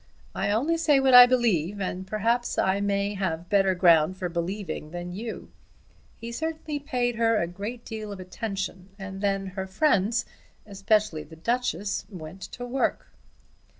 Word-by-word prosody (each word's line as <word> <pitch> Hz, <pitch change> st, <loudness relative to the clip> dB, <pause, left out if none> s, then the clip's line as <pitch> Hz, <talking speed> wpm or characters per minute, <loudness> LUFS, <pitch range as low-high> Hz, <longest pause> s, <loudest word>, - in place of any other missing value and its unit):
I -, -, -1 dB
only 275 Hz, +11 st, +1 dB
say 310 Hz, -4 st, +4 dB
what 265 Hz, -1 st, +3 dB
I 245 Hz, 0 st, +11 dB
believe, 205 Hz, -7 st, +1 dB
and 185 Hz, -1 st, -4 dB
perhaps 230 Hz, +4 st, 0 dB
I 190 Hz, +1 st, +2 dB
may 200 Hz, 0 st, 0 dB
have 180 Hz, -3 st, -3 dB
better 195 Hz, -2 st, +3 dB
ground 170 Hz, -1 st, +4 dB
for 180 Hz, -1 st, -3 dB
believing 170 Hz, -2 st, -4 dB
than 175 Hz, +1 st, -6 dB
you. 220 Hz, +5 st, -7 dB, 0.7 s
He 230 Hz, +1 st, -7 dB
certainly 315 Hz, +2 st, -3 dB
paid 250 Hz, -5 st, -1 dB
her 230 Hz, -1 st, +3 dB
a 170 Hz, -, +1 dB
great 205 Hz, +7 st, -7 dB
deal 215 Hz, -2 st, -6 dB
of 200 Hz, -, -7 dB
attention, 190 Hz, 0 st, -5 dB
and 195 Hz, -1 st, -7 dB
then 195 Hz, -1 st, 0 dB
her 190 Hz, 0 st, -4 dB
friends, 225 Hz, 0 st, +2 dB, 0.4 s
especially 200 Hz, -4 st, +1 dB
the 155 Hz, +2 st, -12 dB
Duchess, 205 Hz, 0 st, -2 dB
went 180 Hz, -1 st, -9 dB
to 245 Hz, +6 st, -7 dB
work." 255 Hz, +2 st, -1 dB
200 Hz, 155 wpm, -26 LUFS, 185-235 Hz, 0.7 s, I